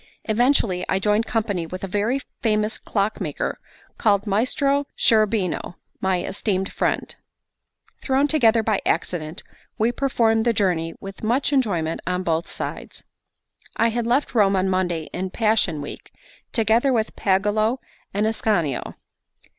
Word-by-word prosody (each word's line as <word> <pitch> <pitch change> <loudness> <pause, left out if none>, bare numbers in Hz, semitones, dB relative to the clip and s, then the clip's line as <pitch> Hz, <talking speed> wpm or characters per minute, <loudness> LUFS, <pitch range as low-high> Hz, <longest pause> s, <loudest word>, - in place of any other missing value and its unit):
Eventually 220 -5 +2
I - - +2
joined 210 +3 +1
company 205 -7 -1
with 185 +3 -7
a - - -2
very 210 +8 0 0.2
famous 215 -1 0
clockmaker, 205 +1 -2 0.4
called 205 -2 +3
Maestro 275 +7 +1
Cherubino, 215 -5 +1 0.2
my 190 -2 0
esteemed 190 -1 -1
friend. - - -1 0.9
Thrown 270 +1 +2
together 235 -7 +4
by 215 -2 +1
accident, 160 -2 -2 0.3
we 225 +2 +2
performed 230 -4 +2
the 235 0 +2
journey 175 -5 0
with 195 0 -9
much 250 +6 +1
enjoyment 175 - 0
on 180 0 0
both 165 -1 0
sides. - - -6 0.7
I 230 - +3
had 230 0 -2
left 255 +5 +1
Rome 200 -4 +4
on 190 0 +1
Monday 180 -3 0
in 185 +1 -3
Passion 210 -7 +1
Week, 145 - -8 0.4
together 230 +3 +3
with 220 -3 0
Pagolo 210 +5 +1 0.3
and 205 +2 0
Ascanio. 205 - 0
210 Hz, 130 wpm, -23 LUFS, 185-230 Hz, 0.9 s, together